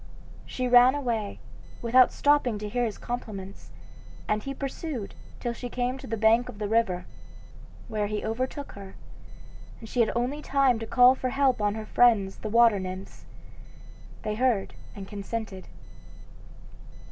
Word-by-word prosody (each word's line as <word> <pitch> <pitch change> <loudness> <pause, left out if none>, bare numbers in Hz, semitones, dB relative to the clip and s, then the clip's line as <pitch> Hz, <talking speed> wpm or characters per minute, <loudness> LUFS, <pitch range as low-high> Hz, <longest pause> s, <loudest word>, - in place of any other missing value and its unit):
She 255 -1 -2
ran 245 +2 +6
away, 230 -7 -2 0.5
without 245 +2 +5
stopping 285 -6 +2
to 210 0 -5
hear 245 +3 0
his 215 -3 -4
compliments, 205 -5 -7 0.6
and 210 0 0
he 275 - -5
pursued 275 -4 -5 0.3
till 240 - -2
she 245 +1 -7
came 250 +2 -2
to - - -10
the 225 - -3
bank 225 +3 +3
of - - -9
the 210 0 -3
river, 200 -5 +1 0.8
where 210 -1 -2
he 210 0 -3
overtook 255 +6 -3
her, 195 -1 -11 0.8
and 225 - -10
she 245 - -4
had 230 - +3
only 250 +5 -1
time 270 -5 +2
to 225 - -6
call 250 +2 +6
for 260 -1 -3
help 265 -3 +1
on 205 0 +1
her 220 -1 -6
friends 215 -5 +3
the 215 - -6
water 230 -2 +5
nymphs. 185 0 -7 1.0
They 215 - -2
heard 230 -3 0 0.2
and 195 -1 -8
consented. 205 -1 -6
230 Hz, 155 wpm, -27 LUFS, 210-250 Hz, 1.0 s, ran